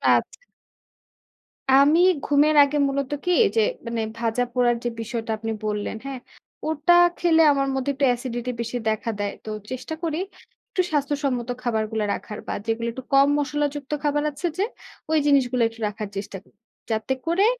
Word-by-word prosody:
আচ্ছা। - - -2 1.4
আমি 285 +4 +6 0.3
ঘুমের 295 +1 +4
আগে 285 +1 0
মূলত 275 0 -2
কি - - -2 0.2
ওইযে 450 - +2 0.2
মানে 230 -1 -2 0.2
ভাজা 230 +1 0
পোড়ার 245 -1 +3
যে, 240 - 0
বিষয়টা 225 0 -4
আপনি 225 +1 -4
বললেন 210 0 -2
হ্যাঁ, 270 -2 -5 0.5
ওটা 315 +2 +3 0.2
খেলে 325 -2 +4
আমার 275 -1 +1
মধ্যে 265 +1 -1
একটু 275 +1 +1
অ্যাসিডিটি 245 0 -2
বেশি 235 +1 -3
দেখা 220 +1 -2
দেয়। 205 0 -1
তো 220 - -7 0.2
চেষ্টা 255 +4 -5
করি 320 -2 -1 0.5
একটু 370 - +1
স্বাস্থ্যসম্মত 280 -4 -1
খাবারগুলা 220 -2 -1
রাখার 210 - -6
বা - - -2
যেগুলা 230 0 -1
একটু 260 - -7
কম 275 +1 +6
মশলা 295 0 0
যুক্ত 285 -1 -7
খাবার 295 0 +1
আছে 320 +5 -3
যে, 385 - +2 0.5
ওই 315 - +4
জিনিসগুলা 260 -4 +3
একটু 225 0 -12
রাখার 210 0 -5
চেষ্টা 195 0 -5
করি। - - -28 0.4
যাতে 220 +4 0
করে 340 +5 +3
260 Hz, 165 wpm, -24 LUFS, 230-290 Hz, 1.4 s, আমি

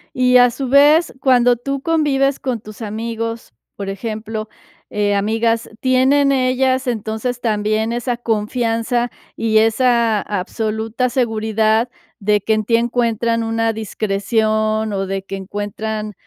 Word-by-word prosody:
Y, 250 0 +4
a 245 0 +6
su 265 +2 -4
vez, 295 +5 +5
cuando 245 -2 +4
tú 275 +3 -4
convives 285 -4 +1
con 250 -4 -2
tus 215 +1 -12
amigos, 230 - -4 0.2
por 200 -1 -5
ejemplo, 215 +2 -5 0.4
eh, 205 -1 0
amigas, 225 +3 0
¿tienen 270 +2 +3
ellas, 260 0 +1
entonces, 225 +2 -2
también 215 0 0
esa 240 0 -2
confianza 230 +1 -1 0.3
y 220 -1 +3
esa 230 -1 +2
absoluta 220 +4 -2
seguridad 220 -1 +1 0.3
de 210 0 +2
que 220 +3 +1
en 215 -1 0
ti 230 - +2
encuentran 230 -1 0
una 225 0 0
discreción 215 +1 -1
o 195 -1 -2
de 195 0 -3
que 195 0 -6
encuentran 210 +2 -4
225 Hz, 130 wpm, -18 LUFS, 215-245 Hz, 0.4 s, a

